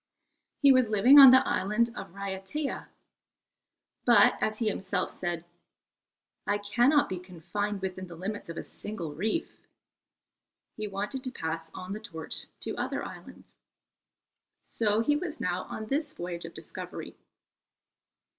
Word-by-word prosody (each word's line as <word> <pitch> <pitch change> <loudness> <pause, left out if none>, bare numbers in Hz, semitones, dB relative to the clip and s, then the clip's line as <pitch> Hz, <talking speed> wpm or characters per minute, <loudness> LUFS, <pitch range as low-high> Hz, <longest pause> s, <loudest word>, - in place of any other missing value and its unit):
He 280 - +8
was 255 -4 +4
living 240 +7 +7
on 270 -2 +12
the 260 +1 +6
island 215 +5 +1
of - - -7
Raiatea: 200 +9 -4 1.2
but - - +6
as 215 0 0
he 225 - -1
himself 195 -2 -1
said, 175 -2 -4 1.0
"I 205 - +2
cannot 240 +8 +3
be 185 - -4
confined 190 +3 -4
within 185 0 -4
the 170 - -10
limits 195 +3 -5
of 165 - -6
a - - -4
single 175 -8 -7
reef." 215 - -3 1.1
He 215 -1 -4
wanted 205 +6 -3
to 255 - -3
pass 165 -6 -4
on 185 +2 -6
the 210 - -5
torch 165 -8 -6
to - - -4
other - - -2
islands. - - -12 1.1
So 215 -1 +1
he 295 +5 +2
was 305 -2 -4
now 180 -4 -2
on 220 - -6
this 295 +5 -1
voyage 175 -1 -6
of 165 - -10
discovery. - - -8
205 Hz, 140 wpm, -29 LUFS, 180-235 Hz, 1.2 s, on